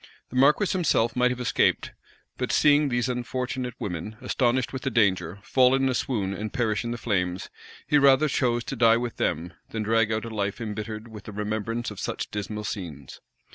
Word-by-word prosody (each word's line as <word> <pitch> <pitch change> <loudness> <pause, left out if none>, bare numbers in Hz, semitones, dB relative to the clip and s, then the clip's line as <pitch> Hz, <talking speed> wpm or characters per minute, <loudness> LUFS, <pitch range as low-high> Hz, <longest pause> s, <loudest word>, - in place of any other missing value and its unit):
The - - -10
marquis 140 +10 +5
himself 140 - +1
might 125 0 +3
have 125 0 -3
escaped; 125 - +1 0.5
but - - -1
seeing 145 -1 +4
these 120 0 0
unfortunate 125 0 -3
women, 90 +3 -5
astonished 130 0 0
with 130 - -4
the 135 - -1
danger, 95 -7 +1
fall 130 0 +4
in 135 0 +2
a 130 - +1
swoon, 105 -8 -1
and 105 +2 -5
perish 110 -6 0
in 120 - -3
the 120 - -3
flames, 90 -5 -2 0.3
he 150 -1 +4
rather 140 +2 +5
chose 120 -4 +1
to 135 - -5
die 115 -2 +5
with 120 -1 -4
them, 85 +3 -1 0.2
than 110 -1 -3
drag 115 0 +2
out 110 +1 -1
a - - -5
life 100 0 -2
imbittered 110 0 -5
with 110 -3 -11
the - - -7
remembrance 110 +3 -3
of 105 - -9
such - - -4
dismal 105 +1 -4
scenes. 80 -11 -6
115 Hz, 195 wpm, -26 LUFS, 105-125 Hz, 0.5 s, marquis